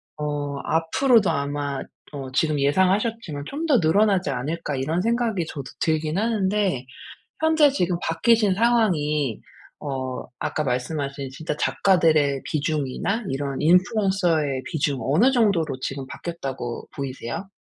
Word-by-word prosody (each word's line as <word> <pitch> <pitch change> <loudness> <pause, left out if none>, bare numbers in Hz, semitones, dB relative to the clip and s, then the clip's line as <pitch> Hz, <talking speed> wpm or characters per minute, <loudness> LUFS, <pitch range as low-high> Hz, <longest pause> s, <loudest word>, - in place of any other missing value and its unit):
어 145 -1 -3
앞으로도 195 +7 +3
아마 145 -2 -2 0.3
어 135 -2 -6
지금 150 +2 +1
예상하셨지만 185 +1 +1
'좀 295 - -4
더 285 -7 +4
늘어나지 190 +1 +3
않을까.' 145 +3 -3
이런 155 +7 -1
생각이 230 -4 0
저도 140 -5 -6 0.2
들긴 155 0 0
하는데 200 - 0 0.5
현재 315 -2 +5
지금 180 -10 0
바뀌신 215 +4 +3
상황이 160 - +1 0.4
어 130 -2 -3 0.2
아까 155 - -2
말씀하신 140 +2 -2
진짜 150 +3 -4
작가들의 155 -9 +2
비중이나 155 - -1
이런 140 0 -3
인플루언서의 180 - +2
비중 140 -3 -1
어느 160 - +3
정도로 195 - +1
지금 135 +1 -4
바뀌었다고 135 -9 -6
보이세요? 135 +5 -5
160 Hz, 305 characters per minute, -24 LUFS, 140-200 Hz, 0.5 s, 현재